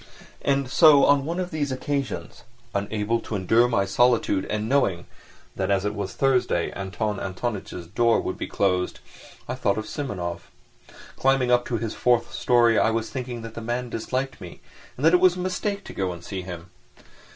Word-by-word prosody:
And 140 -1 +1
so 145 +1 +6
on 140 -1 +4
one 170 +3 -2
occasion, 145 -5 -2 0.4
unable 105 +3 -1
to 110 - -6
endure 110 +5 +3
my 100 -5 +1
solitude 110 -2 +2
and 105 0 -2
knowing 105 -10 +1 0.5
that - - -2
as 100 0 +1
it 105 - -1
was 100 -2 -4
Thursday 130 -10 +1
Anton 100 +1 -3
Antonitch's 95 -2 -4
door 115 +6 +2
would - - -3
be - - -5
closed, 90 -2 0 0.5
I 125 - -2
thought 105 -6 0
of 110 - -3
Simonov. 90 -12 -5 0.7
Climbing 135 -2 +2
up 120 0 +3
to 120 - -1
his 115 -1 -3
fourth 120 -1 +1
storey 120 -1 +3
I - - +3
was 115 0 -2
thinking 125 -3 -5
that 115 -1 -8
the 115 - -7
man 120 +2 -3
disliked 130 +3 -3
me 90 -2 -10 0.4
and 135 - -1
that 165 - +6
it 180 - +6
was 180 -1 +5
a - - -6
mistake 195 +2 -2
to - - -10
go 95 -2 -1
and 85 -1 -9
see 95 -2 -4
him. 90 -1 -9
115 Hz, 180 wpm, -24 LUFS, 100-135 Hz, 0.7 s, so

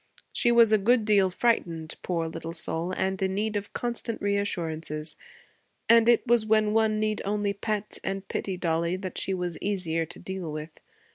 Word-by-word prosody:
She 240 - +3
was 235 -2 +6
a 215 - +5
good 230 +2 +3
deal 200 -3 +4
frightened, 170 -7 0
poor 170 -2 -1
little 165 0 -6
soul, 170 +1 -2
and 190 0 -1
in 190 0 0
need 215 +1 -1
of 205 0 -3
constant 235 -1 -2
reassurances; 165 -6 -2 0.7
and 230 0 +6
it 240 +1 +4
was 240 -2 +4
when 215 -1 +2
one 220 -1 +2
need 215 0 0
only 205 0 0
pet 210 +1 -3
and 195 0 -3
pity 190 -2 -3
Dollie 170 0 0
that 185 -1 -3
she 190 - 0
was 180 -2 -3
easier 170 -5 -1
to - - -9
deal 190 -4 -5
with. 155 +1 -7
195 Hz, 180 wpm, -27 LUFS, 170-215 Hz, 0.7 s, was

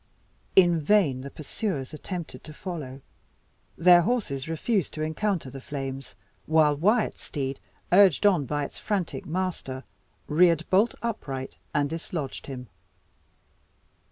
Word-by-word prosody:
In 175 -3 +6
vain 150 -6 +3
the 140 - -7
pursuers 155 - -4
attempted 170 +1 -6
to 155 - -9
follow. 150 -8 -6 0.8
Their 175 +1 +7
horses 170 - -1
refused 185 +3 -1
to 155 - -2
encounter 160 -2 -1
the 135 0 -8
flames; 135 -1 -6 0.3
while 155 -2 +4
Wyat's 210 +9 +1
steed, 135 -2 -4 0.3
urged 190 -1 +6
on 175 -9 +4
by 145 +1 -1
its - - -9
frantic 200 -5 -2
master, 165 -6 -3 0.4
reared 165 +1 +3
bolt 205 +5 +4
upright, 135 - -4
and 145 -1 +1
dislodged 160 -2 -5
him. 125 -3 -7
160 Hz, 125 wpm, -27 LUFS, 140-185 Hz, 0.8 s, Their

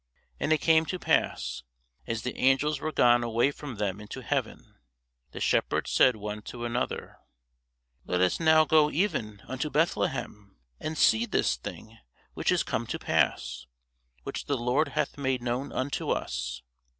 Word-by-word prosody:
And - - -1
it 155 -3 +3
came 160 -1 +4
to 185 - -2
pass, 65 - 0 0.5
as 115 0 -3
the 125 - -3
angels 135 +3 +2
were 155 - -3
gone 120 -4 +4
away 120 +4 +2
from 145 -3 -8
them 105 -1 -2
into 105 - -8
heaven, - - -3 0.5
the - - -8
shepherds - - +1
said 130 -2 +5
one 105 0 -5
to 120 +2 -7
another, 120 +1 -3 0.9
Let 90 - 0
us 90 0 +2
now 160 -1 +5
go 155 -1 +4
even 115 - -1
unto 130 +4 -3
Bethlehem, 105 - -1 0.2
and 155 0 -4
see 115 -3 +4
this - - +1
thing 110 - -9 0.3
which - - 0
is - - +2
come - - -2
to - - -3
pass, 60 0 0 0.6
which - - -5
the 140 - 0
Lord 125 +6 +1
hath 150 -1 -1
made 130 -3 -1
known 125 +3 -2
unto 130 +2 -2
us. 60 0 -2
125 Hz, 160 wpm, -28 LUFS, 105-150 Hz, 0.9 s, said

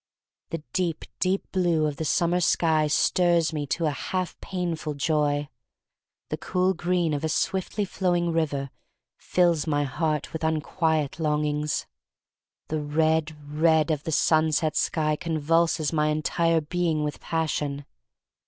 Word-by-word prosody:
The 165 -2 -5
deep, 170 -4 -1
deep 190 +2 +1
blue 175 -4 +2
of 150 -2 -2
the 160 - -3
summer 175 +3 +2
sky 160 -3 +2
stirs 170 +2 +2
me 145 -2 -3
to, 165 +4 -1
a 150 - +2
half 180 +6 -3
painful 170 -5 -3
joy. 145 0 +1 0.8
The - - -2
cool 185 +1 +1
green 175 -3 0
of 145 - -2
a 160 - 0
swiftly 190 +5 -1
flowing 175 -3 0
river 145 -4 -1 0.5
fills 170 -3 +2
my 145 -1 +1
heart 150 +2 -2
with 160 - -4
unquiet 160 -1 0
longings. 150 -1 0 0.8
The 155 -1 -1
red, 155 +1 +1
red 155 +1 +3
of 150 -2 -1
the 160 - -3
sunset 155 0 +2
sky 155 -2 +1
convulses 165 -1 +1
my 150 -1 +2
entire 160 +2 +1
being 160 -1 -1
with 150 0 -3
passion. 150 -3 -2
160 Hz, 135 wpm, -26 LUFS, 150-170 Hz, 0.8 s, red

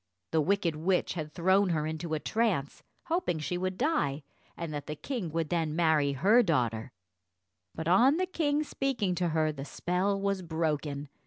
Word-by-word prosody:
The 160 - +3
wicked 180 -1 +1
witch 180 +4 0
had 155 -3 -5
thrown 190 +4 +3
her 155 -3 0
into 160 +1 -3
a - - -2
trance, 205 -9 -1 0.2
hoping 340 - -1
she 155 +3 -3
would 185 +1 -2
die, 160 - 0 0.3
and 165 -2 -4
that 145 -1 -5
the 150 - -4
king 200 - -4
would 160 -1 -2
then 160 -3 0
marry 160 -4 +3
her 200 - +5
daughter; 120 - 0 0.8
but 160 - -4
on 245 - +5
the 370 - +1
king 305 -5 0
speaking 265 -10 -1
to 175 0 0
her, 155 -1 +1
the 135 -2 -7
spell 185 +7 -1
was 195 -1 -1
broken. 155 -4 -2
170 Hz, 175 wpm, -30 LUFS, 155-200 Hz, 0.8 s, her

